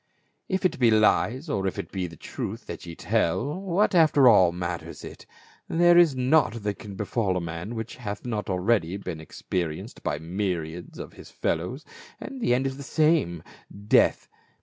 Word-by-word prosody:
If 190 0 -1
it 185 - +1
be 120 -3 +5
Hcs, 115 +6 +3
or 95 -9 -1
if 95 - -3
it 85 - -5
be 95 -2 -3
truth 80 - -6
that - - -8
ye 85 - -7
tell, 115 - 0
what 195 +2 +1
after 155 -6 +5
all 95 -7 +6
matters 85 -1 -5
it; - - -10 0.4
there 175 +1 +5
is 170 -5 +6
naught 125 -4 +2
that 105 -1 -2
can 100 -2 -9
befall 100 -1 -1
a - - 0
man 85 +6 -5
which 110 0 -6
hath 105 -3 -6
not 110 -4 -3
already 95 -1 +1
been 90 -5 -6
ex 80 - -13
perienced 85 -4 -3
by 75 - -2
myriads 85 0 -4
of - - -8
his - - -13
fellows, 90 - -3 0.3
and 270 -2 -8
the 120 - +3
end 130 +2 0
is 135 0 -2
the - - -8
same 150 - +1 0.2
— 100 +1 -14
death. - - +1
105 Hz, 185 wpm, -26 LUFS, 90-135 Hz, 0.4 s, all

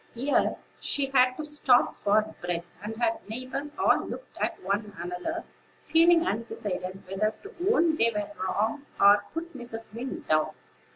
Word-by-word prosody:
Here 270 +4 +2 0.2
she 275 -1 0
had 255 -1 +5
to 310 - -4
stop 295 -4 +3
for 215 +1 +1
breath; 175 -1 -2 0.2
and 220 +1 -4
her 230 -1 +1
neighbors 260 +5 -5
all - - +3
looked - - -8
at - - -1
one 205 +2 -2
another, 180 - -4 0.4
feeling 330 +2 +5
undecided 195 -4 -3
whether 210 +3 0
to 410 +3 -10 0.2
own 330 -6 +3
they 230 - +4
were 210 -2 -3
wrong, 220 +9 -1
or 200 +1 +8
to 205 - -9
put 335 0 -6
Mrs. 225 -4 -6
Wing 245 +4 -5
down. 155 0 +2
230 Hz, 160 wpm, -28 LUFS, 205-290 Hz, 0.4 s, or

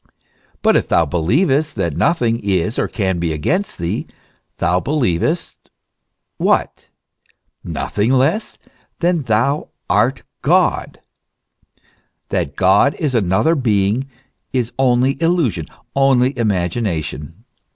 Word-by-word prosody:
But - - +4
if - - +2
thou 85 - +3
believest 135 - +1
that - - -2
nothing 120 -8 +1
is 100 +1 -1
or - - +1
can 95 -4 -1
be 85 -1 -1
against 165 - -1
thee, 85 -1 -3 0.5
thou 90 +1 +1
be - - -7
lievest 150 - -1 0.7
what? - - 0 0.8
nothing 105 +4 -1
less 140 - +1 0.4
than 175 0 +1
that 145 -5 -6
thou 125 +7 +1 0.2
art 120 +6 +1 0.2
God.f - - +1 1.3
That 70 0 -2
God 95 - +4
is 150 -4 -2
another 110 - +2
being 115 -1 0 0.4
is 125 -2 -1
only 130 +2 +2
illusion, 160 - +1 0.3
only 135 -1 +3
imagination. 90 - -2
120 Hz, 110 wpm, -18 LUFS, 95-140 Hz, 1.3 s, But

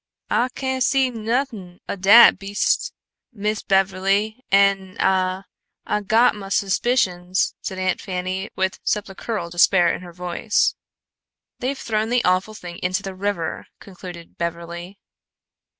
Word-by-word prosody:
"Ah 245 - +2
cain' 260 -1 -2
see 265 0 +2
nothin' 225 -5 -3
o' - - -3
dat 200 +3 +7
beastes, 200 +1 0 0.4
Miss 210 -1 -2
Beverly 195 +4 +1
an' 195 -1 +2
Ah 185 0 +1 0.4
Ah 210 - 0
got 220 +4 +3
mah 195 -2 -8
suspicions," 190 -3 +1
said 190 - -5
Aunt 185 0 -1
Fanny, 185 +1 -4
with 190 0 -1
sepulchral 205 -2 -3
despair 175 0 +4
in - - -5
her 175 -1 -10
voice. 180 +4 0 0.9
"They've 265 +2 -2
thrown 220 -2 -1
the 245 0 +1
awful 185 +4 +1
thing 175 -4 -9
into 185 +2 -1
the 195 - -5
river," 185 -4 -3
concluded 180 -3 -11
Beverly. 170 +2 -5
195 Hz, 130 wpm, -22 LUFS, 180-215 Hz, 0.9 s, dat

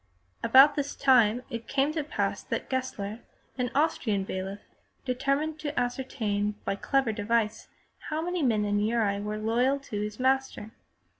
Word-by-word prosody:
About 275 +3 +7
this 285 -1 -3
time 250 -3 +4
it 230 0 -5
came 275 +1 +1
to 310 -2 -1
pass 290 - -2
that - - -4
Gessler, 230 -5 -3 0.4
an 250 0 0
Austrian 240 -9 +1
bailiff, 190 +1 -5 0.4
determined 275 +5 -1
to 300 -3 -2
ascertain 225 -5 -1
by - - 0
a - - -6
clever 270 +1 +1
device 220 +1 -1 0.4
how 310 - -1
many 350 +1 -2
men 220 -6 +2
in 205 0 +1
Uri 210 -2 +1
were 210 +1 -3
loyal 240 +5 +1
to 210 -6 -5
his 210 +1 -5
master. 265 -4 0
245 Hz, 155 wpm, -28 LUFS, 210-275 Hz, 0.4 s, About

